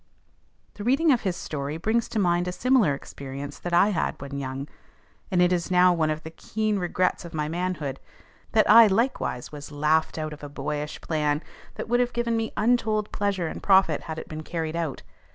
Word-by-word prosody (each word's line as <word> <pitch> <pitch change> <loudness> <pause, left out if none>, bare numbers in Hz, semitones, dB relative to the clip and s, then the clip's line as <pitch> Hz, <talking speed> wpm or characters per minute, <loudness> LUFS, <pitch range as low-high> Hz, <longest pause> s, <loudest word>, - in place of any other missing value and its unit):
The 205 - -8
reading 280 +7 +3
of 250 - +3
his 190 -4 -1
story 150 -3 -4
brings 220 +7 0
to - - -4
mind 175 -3 +2
a - - -1
similar 230 - +3
experience 140 +1 -8
that 175 - -5
I 175 +4 +5
had 185 -6 -1
when 140 0 -6
young, 135 +1 -5 0.6
and 180 -3 +3
it 180 +1 +3
is 175 -1 -1
now 180 0 +5
one 160 -2 +1
of 155 +1 -3
the 160 - -8
keen 215 +4 -2
regrets 180 0 0
of 170 -2 -9
my 150 -1 -1
manhood, 160 -5 -3 0.5
that 215 -1 +4
I 225 +1 +9
likewise 205 - -1
was 145 -1 -9
laughed 155 +3 +1
out 155 -1 -3
of 150 - -12
a 145 - -6
boyish 150 +1 -4
plan 150 -1 0 0.3
that - - -5
would 240 +2 +2
have 245 -1 +1
given 235 -1 0
me 225 0 -1
untold 215 -2 +1
pleasure 200 -3 -1
and - - -6
profit 190 -6 +4
had 160 - -4
it - - -7
been 155 0 -6
carried 160 0 -4
out. 165 -5 -3
175 Hz, 205 wpm, -26 LUFS, 150-210 Hz, 0.6 s, I